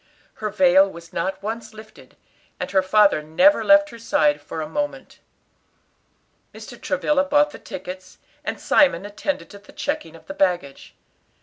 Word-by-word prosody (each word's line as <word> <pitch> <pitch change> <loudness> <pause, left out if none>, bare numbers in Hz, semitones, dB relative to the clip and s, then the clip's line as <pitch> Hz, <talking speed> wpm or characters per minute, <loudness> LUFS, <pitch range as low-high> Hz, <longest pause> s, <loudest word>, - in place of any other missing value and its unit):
Her 215 - -1
veil 190 -1 +4
was 170 -2 -13
not 190 +3 -3
once 225 +1 -6
lifted, 215 0 -15 0.4
and - - -4
her 190 -1 +3
father 195 -3 +3
never 160 - +3
left 300 0 +5
her 235 - -11
side 150 -9 +1
for 155 - -7
a 155 - -4
moment. 290 0 -5 1.4
Mr. - - -11
Travilla 290 -2 +1
bought 290 +1 +2
the - - -11
tickets, 185 0 -9 0.3
and - - -4
Simon 205 - +3
attended 220 +8 -4
to 200 - -12
the 205 - -18
checking 290 - -4
of 165 - -16
the 290 - -7
baggage. 175 - -2
200 Hz, 160 wpm, -22 LUFS, 175-280 Hz, 1.4 s, left